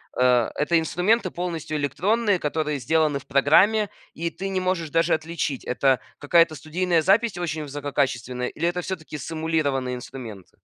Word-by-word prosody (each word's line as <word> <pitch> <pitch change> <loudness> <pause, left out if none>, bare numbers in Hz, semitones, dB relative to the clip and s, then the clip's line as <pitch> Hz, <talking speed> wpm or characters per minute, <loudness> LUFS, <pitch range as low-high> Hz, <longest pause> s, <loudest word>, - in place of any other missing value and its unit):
а, 125 -2 +3
это 165 +3 +2
инструменты 185 +5 +1
полностью 165 -3 -3
электронные, 205 +8 +1
которые 150 -2 -2
сделаны 155 +2 +1
в 140 - -10
программе, 195 +10 +4 0.2
и 170 +1 -3
ты 195 +3 -5
не 190 -1 -1
можешь 180 -4 -1
даже 165 - +2
отличить, 160 -4 -3
это 130 +1 +2 0.2
какая-то 165 +2 +4
студийная 170 +2 0
запись 200 +3 +2
очень 160 -3 -3
высококачественная 135 -4 -2
или 170 - -2
это 175 +1 -1
всё-таки 160 -4 -6
сэмулированные 145 -5 -1
инструменты. 120 -6 -9
160 Hz, 145 wpm, -24 LUFS, 140-175 Hz, 0.2 s, программе